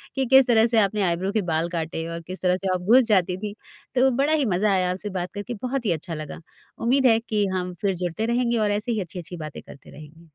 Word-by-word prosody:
कि 265 -1 +1
किस 265 -1 +7
तरह 225 -1 +5
से 225 - +5
आपने 205 0 +1
आइब्रो 185 +4 -1
के 215 -1 +1
बाल 165 +2 0
काटे 165 0 -3
और 170 - -5
किस 185 - -7
तरह 180 0 +2
से 185 - +1
आप 180 - -2
घुस 260 - +7
जाती 180 -1 +2
थी। 205 +1 -5 0.4
तो 260 +1 +4
बड़ा 300 +3 +2
ही 295 -4 +2
मज़ा 205 +2 +2
आया 185 -1 +1
आपसे 200 +3 -4
बात 175 0 -4
करके, 205 +3 -5
बहुत 250 +2 -4
ही 190 - +2
अच्छा 165 +1 -4
लगा। 155 +1 -7 0.4
उम्मीद 260 +3 +2
है 225 -2 +5
कि 215 -3 -1
हम 180 0 -3
फिर 195 -2 0
जुड़ते 180 +6 -2
रहेंगे 235 0 +1
और 210 -1 +1
ऐसे 210 +4 -1
ही 215 -3 -1
अच्छी-अच्छी 175 0 -8
बातें 155 - -8
करते 140 - -15
रहेंगे। 155 +3 -14
200 Hz, 250 wpm, -24 LUFS, 175-230 Hz, 0.4 s, किस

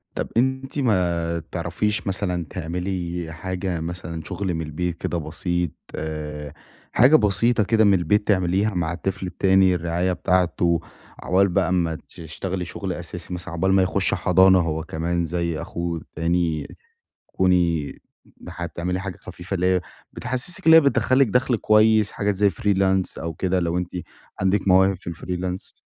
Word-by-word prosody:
طب - - -2
أنتِ 130 +3 0
ما 85 -8 +1
تعرفيش 105 0 -1
مثلًا 90 -3 -1
تعملي 90 0 -4
حاجة 90 +1 -3
مثلًا 85 -1 -5
شغل 95 +1 -3
من 80 - -2
البيت 85 +3 -3
كده 85 - -2
بسيط، 85 +1 -2 0.2
آآ 75 -2 -5 0.4
حاجة 130 +7 +6
بسيطة 110 0 +3
كده 110 +2 +3
من 100 -2 +5
البيت، 95 +3 +1
تعمليها 95 +1 +2
مع 85 -2 -1
الطفل 95 +1 -3
التاني، 95 +1 +3
الرعاية 85 +2 -1
بتاعته، 90 -2 +1 0.4
عقبال 95 +2 +3
بقى 90 0 +1
ما 85 -3 0
تشتغلي 90 +3 -5
شغل 95 +2 -4
أساسي 85 +1 -7
مثلًا، 90 0 -6
عقبال 95 +3 +1
ما 95 -1 +5
يخش 95 0 +2
حضانة 95 +1 +5
هو 80 -2 -1
كمان 85 +2 -2
زي 85 -1 -2
أخوه 85 -1 -4
التاني، 80 0 -1 0.6
تكوني 85 -5 +1 0.5
حتى 85 -2 -6
تعملي 90 +2 -2
حاجة 95 -2 -6
خفيفة 90 +3 -8
اللي 90 -1 0
هي 90 -1 +3 0.3
بتحسسِك 130 +9 -2
إن 160 - +9
هي 165 - +9
بتدخل 135 -2 +2
لِك 135 - +5
دخل 125 +3 +2
كويس، 110 -1 +4
حاجات 100 0 -1
زي 100 +1 +3
freelance 95 +1 0
أو 80 0 -4
كده 95 +3 0
لو 85 0 -1
أنتِ 90 -1 -2 0.5
عندِك 95 +1 +1
مواهب 95 +1 +5
في 90 - -8
الfreelance؟ 90 +2 -5
90 Hz, 155 wpm, -23 LUFS, 85-100 Hz, 0.6 s, إن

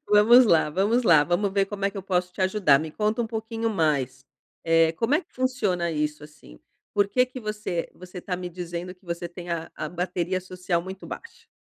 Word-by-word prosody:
Vamos 225 +5 +7
lá, 160 -6 +4
vamos 205 +9 +2
lá. 160 -7 +6
Vamos 185 +4 0
ver 195 0 +2
como 200 0 -5
é 200 - +2
que - - -13
eu - - -6
posso 180 -1 -1
te - - -9
ajudar, 185 -7 +4
me 155 +1 -5
conta 215 +6 -1
um - - -3
pouquinho 225 0 -3
mais, 140 - 0 0.4
eh, 165 0 +4
como 230 - 0
é 315 - +3
que - - -25
funciona 215 -10 0
isso, 150 -1 -2
assim? 105 - -16 0.4
Por 205 -1 +3
que 250 +5 +3
que 255 0 -9
você 210 -6 -3
você 180 0 -10
tá 180 0 -3
me 180 0 -5
dizendo 175 +1 -6
que 185 - -30
você 170 0 -4
tem 175 0 -9
a 165 -1 -3
a 155 - -4
bateria 180 +1 -2
social 180 -1 -2
muito 190 +1 -8
baixa? 465 - -10
180 Hz, 215 wpm, -25 LUFS, 170-210 Hz, 0.4 s, Vamos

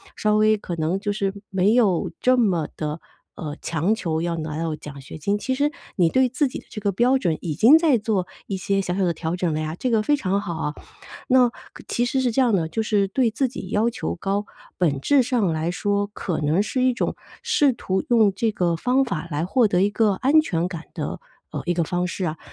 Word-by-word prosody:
稍 210 0 +1
微 215 0 +4
可 180 -4 -5
能 160 +4 0
就 205 +1 -2
是 200 -1 -1 0.2
没 195 +2 +2
有 210 -8 +2
这 255 0 +3
么 180 -10 +2
地， 150 +1 -4 0.4
呃， 150 -2 -5
强 170 +6 0
求 160 -6 -2
要 170 0 -1
拿 155 -1 -4
到 165 -2 -2
奖 150 -2 -10
学 135 +3 -10
金。 200 +7 0
其 255 +5 -2
实 290 +2 +1 0.2
你 175 -3 +3
对 260 +7 +3
自 265 +4 0
己 255 - -6
的 - - -17
这 210 - -7
个 200 -1 +1
标 245 +7 +3
准 170 -10 0
已 160 -4 -3
经 235 - +7
在 320 -6 +3
做 210 -4 -1 0.2
一 195 - -2
些 195 +2 0
小 180 -2 -2
小 195 - 0
的 170 - +1
调 160 +1 -3
整 175 -3 -1
了 155 - -1
呀， 155 +1 -3
这 255 - 0
个 225 -2 +3
非 295 +7 +3
常 200 -4 0
好 175 -4 -4
哦。 150 -2 -3 0.5
那 250 -1 +5
可 - - -15
其 240 - 0
实 265 +2 0
是 255 -2 +1
这 265 - +2
样 240 -4 +3
的， 170 -5 +1
就 220 +8 -2
是 205 -2 +1
对 230 +4 +1
自 260 +4 0
己 230 -7 -8
要 215 +3 +2
求 85 - -4
高， 200 - -2 0.3
本 150 -7 +1
质 275 - +3
上 240 -5 +1
来 160 +2 -1
说 205 +2 0
可 175 -6 -3
能 155 +6 +2
是 250 +4 -1
一 255 0 +3
种 - - -2 0.3
试 450 - +3
图 190 -5 -2
用 220 -5 +4
这 225 +3 0
个 175 -4 0
方 255 +9 +2
法 175 -8 -4
来 150 +3 -1
获 235 +5 +3
得 180 -3 +1
一 200 - +3
个 210 0 +2
安 280 +10 +4
全 175 - -1
感 170 -3 -7
的， - - -4 0.3
呃， - - -4
一 175 - +1
个 170 -1 +1
方 175 +3 -1
式 180 +1 -3
啊。 160 -1 -3
200 Hz, 260 characters per minute, -23 LUFS, 170-235 Hz, 0.5 s, 经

